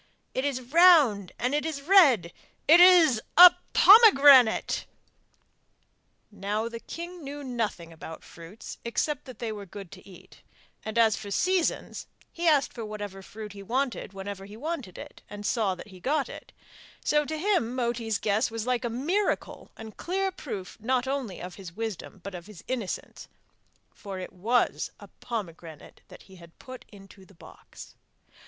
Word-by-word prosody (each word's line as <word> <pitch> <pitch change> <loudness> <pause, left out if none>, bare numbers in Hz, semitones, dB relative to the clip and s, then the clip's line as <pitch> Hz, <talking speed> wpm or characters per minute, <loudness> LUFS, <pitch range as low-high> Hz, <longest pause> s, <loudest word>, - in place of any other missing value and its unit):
It 260 - -2
is 260 -3 -2
round 300 - +5
and 250 +3 -1
it 295 - 0
is 305 -3 -5
red! 275 - +5 0.3
It 325 +4 +7
is 340 -10 +6 0.2
a 355 0 +11 0.2
pomegranate!' 285 - +6 1.4
Now 205 +2 -3
the 230 0 -7
king 345 +5 -9
knew 285 +1 -7
nothing 220 -10 -4
about 160 0 -10
fruits 170 +6 -12
except 265 +5 -2
that 255 - -11
they 230 -2 -4
were 205 -2 -8
good 195 -1 -10
to - - -14
eat; 185 - -17 0.4
and, 220 +1 -6
as 225 -2 +4
for 210 -2 -8
seasons, 365 - -1 0.3
he 340 0 -2
asked 295 -4 +3
for 235 - -7
whatever 205 -2 -7
fruit 210 +1 -10
he 200 - -10
wanted 245 +1 -3
whenever 195 0 -8
he 205 +2 -12
wanted 275 - -6
it, - - -11
and 205 0 -9
saw 205 -5 0
that 185 - -12
he 185 -2 -14
got 280 - -1
it; - - -11 0.5
so 300 0 +2
to 315 +2 -5
him 310 - 0
Moti's 235 -3 -2
guess 210 +5 0
was 225 -1 -5
like 250 0 -1
a 240 - -2
miracle, 325 - -2
and 220 -1 -11
clear 385 +2 -2
proof 210 - -8
not 250 +3 -1
only 265 -8 -4
of 180 0 -8
his 175 -3 -10
wisdom 215 -3 -6
but 200 - -7
of 175 0 -9
his 210 -5 -13
innocence, 235 -7 -5 0.7
for 195 -2 -9
it 185 +1 -8
was 225 +7 0
a - - -13
pomegranate 170 -9 -8
that - - -15
he 190 -1 -17
had 170 -1 -17
put 255 -1 -12
into 195 -1 -16
the 195 0 -20
box. - - -14
230 Hz, 165 wpm, -27 LUFS, 200-285 Hz, 1.4 s, a